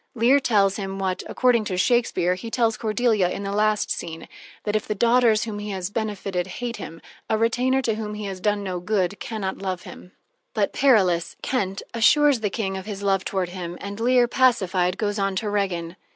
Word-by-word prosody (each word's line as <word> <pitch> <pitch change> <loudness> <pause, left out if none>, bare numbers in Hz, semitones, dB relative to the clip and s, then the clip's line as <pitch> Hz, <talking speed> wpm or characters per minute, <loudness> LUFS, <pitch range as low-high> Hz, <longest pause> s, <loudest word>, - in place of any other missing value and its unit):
Leir 245 +5 +4
tells 200 -7 +2
him 195 -2 -4
what, 190 -1 -2
according 245 -3 +3
to 190 -3 -3
Shakespeare, 185 -5 +2
he 185 +5 -6
tells 225 -1 +1
Cordelia 215 -4 +1
in 200 - -4
the 195 - -3
last 210 +1 +1
scene, 165 -1 -5 0.4
that, 210 0 -1
if 215 - -1
the 210 - -1
daughters 235 0 +4
whom 215 -3 -5
he 210 0 -5
has 190 -1 -4
benefited 200 -4 -2
hate 235 +5 -5
him, 165 +1 -9 0.3
a 220 - +2
retainer 250 +4 +1
to 225 - +1
whom 210 -1 -5
he 210 0 -5
has 190 -2 -5
done 205 +1 0
no 185 -2 -3
good 190 0 -1
can 220 -2 -5
not 190 -1 -3
love 185 -2 -3
him. 180 - -12 0.4
But - - +1
Perillus 190 -11 +3
Kent 195 -7 -1
assures 270 +4 +4
the 210 -2 -1
King 195 -2 -3
of 190 +2 -8
his 200 -2 -5
love 195 -1 +2
toward 190 -2 -2
him, 175 -1 -6
and 200 +1 -7
Leir, 245 +1 +4
pacified, 195 -8 +2
goes 205 -1 -1
on 195 -1 0
to 205 +2 -2
Regan. 180 -4 -2
205 Hz, 205 wpm, -24 LUFS, 190-230 Hz, 0.4 s, Leir